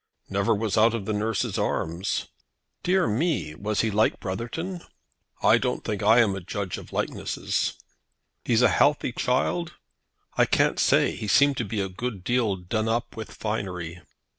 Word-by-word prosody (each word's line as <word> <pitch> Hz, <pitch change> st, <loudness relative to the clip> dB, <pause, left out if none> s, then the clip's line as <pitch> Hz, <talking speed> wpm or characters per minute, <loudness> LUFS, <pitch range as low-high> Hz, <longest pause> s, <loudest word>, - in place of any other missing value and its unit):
"Never 100 Hz, +3 st, +2 dB
was 110 Hz, 0 st, 0 dB
out 115 Hz, +1 st, +5 dB
of 105 Hz, -4 st, -4 dB
the 110 Hz, -, -1 dB
nurse's 105 Hz, +1 st, -1 dB
arms." 85 Hz, +4 st, -1 dB, 0.6 s
"Dear 185 Hz, 0 st, +2 dB
me! 125 Hz, -, 0 dB
Was 105 Hz, +6 st, -1 dB
he 115 Hz, -, 0 dB
like 110 Hz, +2 st, +2 dB
Brotherton?" 120 Hz, -, -4 dB, 0.6 s
"I -, -, +6 dB
don't -, -, -2 dB
think 105 Hz, -2 st, -3 dB
I 110 Hz, +3 st, +6 dB
am 105 Hz, -4 st, +2 dB
a 95 Hz, -, -5 dB
judge 100 Hz, 0 st, -4 dB
of -, -, -13 dB
likenesses." -, -, -2 dB, 0.7 s
"He's 120 Hz, 0 st, +3 dB
a -, -, +6 dB
healthy 145 Hz, -3 st, +3 dB
child?" 135 Hz, +8 st, 0 dB, 0.6 s
"I -, -, +4 dB
can't -, -, +2 dB
say. -, -, +3 dB
He 105 Hz, -, -5 dB
seemed 140 Hz, +5 st, +4 dB
to 120 Hz, -, -1 dB
be 105 Hz, 0 st, -2 dB
a 95 Hz, -, -1 dB
good 100 Hz, +1 st, -5 dB
deal 120 Hz, -3 st, +1 dB
done 110 Hz, +5 st, -2 dB
up 120 Hz, +1 st, -1 dB
with 110 Hz, -1 st, -6 dB
finery." 90 Hz, -5 st, -4 dB
110 Hz, 165 wpm, -26 LUFS, 100-120 Hz, 0.7 s, I